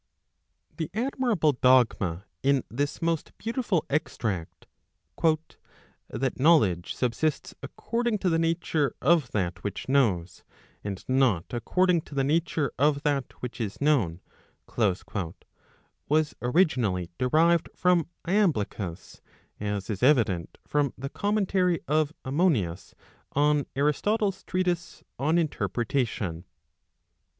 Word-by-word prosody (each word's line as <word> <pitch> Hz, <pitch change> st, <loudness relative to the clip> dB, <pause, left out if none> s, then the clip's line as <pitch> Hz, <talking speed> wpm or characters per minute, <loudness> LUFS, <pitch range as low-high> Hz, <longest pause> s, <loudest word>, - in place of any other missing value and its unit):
The 160 Hz, -3 st, -3 dB
admirable 235 Hz, -, +1 dB
dogma 120 Hz, -9 st, +2 dB, 0.2 s
in 135 Hz, -1 st, +2 dB
this 145 Hz, +7 st, -3 dB
most 165 Hz, -2 st, -1 dB
beautiful 225 Hz, -, -1 dB
extract, 115 Hz, -, -3 dB, 0.3 s
" -, -, -25 dB, 1.0 s
that 135 Hz, -1 st, -2 dB
knowledge 120 Hz, -, +3 dB
subsists 130 Hz, +5 st, -1 dB
according 235 Hz, -1 st, -2 dB
to 190 Hz, -2 st, 0 dB
the 165 Hz, -1 st, +2 dB
nature 165 Hz, -4 st, 0 dB
of 160 Hz, -7 st, +3 dB
that 90 Hz, -3 st, -2 dB
which 100 Hz, -1 st, -4 dB
knows, 110 Hz, -11 st, +1 dB, 0.4 s
and 100 Hz, -2 st, -6 dB
not 130 Hz, -10 st, +2 dB
according 175 Hz, +9 st, +2 dB
to 150 Hz, -, -12 dB
the 135 Hz, -, +2 dB
nature 155 Hz, 0 st, 0 dB
of 145 Hz, 0 st, +2 dB
that 140 Hz, -3 st, 0 dB
which 125 Hz, 0 st, -5 dB
is 105 Hz, -3 st, -3 dB
known/' 130 Hz, -, +2 dB, 1.9 s
was 155 Hz, 0 st, +2 dB
originally 120 Hz, -, +1 dB
derived 160 Hz, +6 st, +3 dB
from 180 Hz, -3 st, +2 dB, 0.2 s
Iamblichus, 110 Hz, -, -1 dB, 0.4 s
as 105 Hz, -2 st, -3 dB
is 100 Hz, -3 st, -4 dB
evident 115 Hz, -, +2 dB
from 145 Hz, -2 st, 0 dB
the 135 Hz, +2 st, -5 dB
commentary 190 Hz, -4 st, +1 dB
of 155 Hz, +1 st, +2 dB
Aminonius 130 Hz, -, 0 dB, 0.4 s
on 145 Hz, 0 st, +2 dB
Aristotle's 195 Hz, +8 st, +1 dB
treatise 180 Hz, -2 st, -2 dB, 0.2 s
On 155 Hz, +5 st, +2 dB
Interpretation. 120 Hz, -, -1 dB
140 Hz, 105 wpm, -27 LUFS, 110-170 Hz, 1.9 s, knowledge